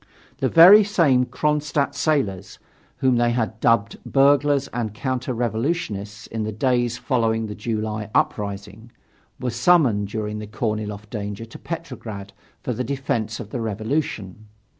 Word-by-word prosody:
The 135 -2 +1
very 185 +6 +9
same 155 -11 +3
Kronstadt 150 +3 0
sailors 105 - -1 0.4
whom 130 -2 +3
they 120 0 +3
had 110 -2 -1
dubbed 115 -3 +1
burglars 140 0 +3
and 115 -3 -4
counter 130 +1 -2
revolutionists 115 - -2
in 110 - -5
the 110 - -3
days 120 +1 0
following 115 -4 0
the 105 - -5
July 110 -1 -3
uprising 100 +2 -2 0.5
were 125 - -2
summoned 120 - +3
during 105 0 -4
the 105 - -7
Korniloff 105 -2 -3
danger 105 0 -5
to 115 - -12
Petrograd 115 - -7 0.3
for 125 - -2
the 125 +3 -3
defence 125 -5 -2
of 110 -3 -8
the 120 - -3
revolution. 110 -2 -3
115 Hz, 140 wpm, -23 LUFS, 105-135 Hz, 0.5 s, very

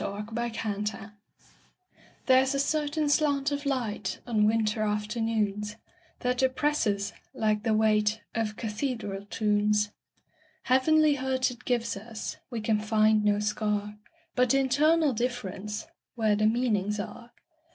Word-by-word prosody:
Part 210 +2 -4
Two: - - -11
Nature 235 -1 -3
LXXXII 210 0 -2 1.3
THERE'S 260 +1 +4
a - - 0
certain 300 +1 0
slant 290 -1 +2
of 285 0 -3
light, 215 -8 -2
On 215 -3 +2
winter 215 -1 +1
afternoons, 210 -1 -1 0.5
That 250 +1 0
oppresses, 255 -7 +1 0.2
like 215 -1 +1
the 220 0 +1
weightOf 215 0 +1
cathedral 210 -3 -3
tunes. 210 0 +1 0.7
Heavenly 295 +3 +4
hurt 260 -1 0
it 245 0 -13
gives 235 -2 0
us; 220 +2 -6
We 235 -3 -4
can 215 0 +1
find 215 0 +3
no 205 0 +3
scar, 210 0 -2 0.3
But 250 +1 +3
internal 290 +3 +3
differenceWhere 215 -1 -3
the 215 +1 +2
meanings 215 -3 +1
are. 235 +3 -7
220 Hz, 120 wpm, -28 LUFS, 210-255 Hz, 1.3 s, THERE'S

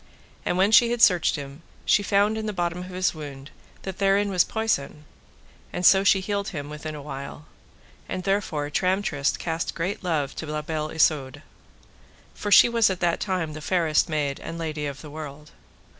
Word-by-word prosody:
And 175 - 0
when 195 +3 +3
she 235 +2 +7
had 240 0 -1
searched 180 -7 +4
him 140 +1 -8 0.2
she - - +4
found 205 +1 +2
in 220 0 -3
the 210 - -2
bottom 175 -1 -2
of 180 - -6
his 185 0 0
wound 145 -3 -9 0.3
that 190 -1 -6
therein 200 +1 +2
was 180 -2 +4
poison, 155 -9 -2 0.7
and 180 - -2
so 190 +2 +7
she 195 -1 +4
healed 200 +1 -2
him 145 -3 -6
within 150 0 -6
a 150 - -7
while; 140 +1 -8 0.6
and 185 0 -4
therefore 170 -7 -1
Tramtrist 185 -5 0
cast 165 -1 -3
great 185 +5 -3
love 155 -6 -1
to 160 - -5
La 150 0 -3
Beale 155 0 -3
Isoud, 150 -5 +1 0.9
for 205 - -5
she 195 - +9
was 230 -2 +3
at 185 -2 -3
that 175 -1 +1
time 180 -6 -2
the 155 - -8
fairest 165 -1 +1
maid 145 -3 -1
and 165 - -7
lady 155 -3 -3
of 140 -1 -7
the 150 - -10
world. 150 -1 -9
165 Hz, 190 wpm, -25 LUFS, 150-195 Hz, 0.9 s, she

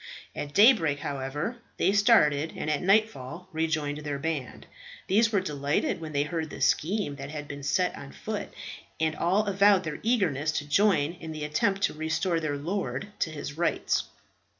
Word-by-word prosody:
At 145 0 -6
daybreak, 185 - +5
however, 145 - -3 0.2
they - - +3
started, 165 -9 +4
and 155 - -2
at 150 - 0
nightfall 180 -5 +1
rejoined 155 -2 -1
their 145 -2 -3
band. 145 -3 -4 0.4
These 225 +3 +3
were 200 -3 +2
delighted 145 -2 -1
when 160 -1 -6
they 145 -1 +1
heard 160 +1 -3
the - - -8
scheme 170 -4 +1
that 140 0 -7
had 150 -1 -6
been 140 0 -7
set 145 +6 +1
on 140 - -9
foot, 215 -1 -5 0.5
and 160 0 +1
all 195 +5 +1
avowed 200 -1 +4
their 155 -3 -5
eagerness 170 - +1
to 145 -2 -3
join 165 -2 +3
in 160 -1 -7
the 155 -1 -5
attempt 195 +6 0
to - - +2
restore 160 +3 0
their 150 -3 -2
lord 195 +5 -3
to - - 0
his 150 -1 -7
rights. 170 - +1
160 Hz, 175 wpm, -27 LUFS, 145-195 Hz, 0.5 s, daybreak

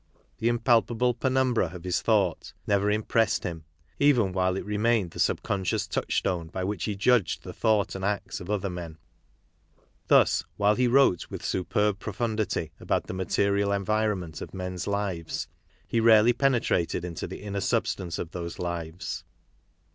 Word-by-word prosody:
The 115 - 0
impalpable 120 0 +2
penumbra 130 -3 +1
of 85 - -9
his 90 -1 0
thought - - +1
never 100 0 +2
im 105 +1 +1
pressed 115 0 +1
him, 80 -3 -5 0.3
even 120 -10 +4
while 95 0 +1
it - - -5
remained 105 -2 +1
the - - -10
subconscious 95 -2 0
touchstone 85 -3 -1
by 95 +3 -4
which 100 -1 -2
he 105 - -2
judged 105 -1 +2
the - - -8
thought 110 -3 +1
and 95 - -6
acts 100 -1 -2
of 90 - -9
other 105 -1 0
men. 85 -3 -6 1.1
Thus, - - +4
while 105 0 +4
he 125 +3 +2
wrote 125 -8 +3
with - - -7
superb 100 +2 0
pro 105 - -5
fundity 110 -1 -1
about - - -1
the - - -6
material 100 +2 +1
environment 100 -4 -1
of - - -8
men's 90 -1 -4
lives, 100 -5 -2 0.4
he 115 - 0
rarely 115 +1 +6
penetrated 115 -10 +1
into 85 -2 -5
the - - -8
inner 100 -1 -3
substance 85 -3 -1
of 80 - -5
those 85 -2 -5
lives. 85 0 -4
100 Hz, 160 wpm, -27 LUFS, 90-110 Hz, 1.1 s, rarely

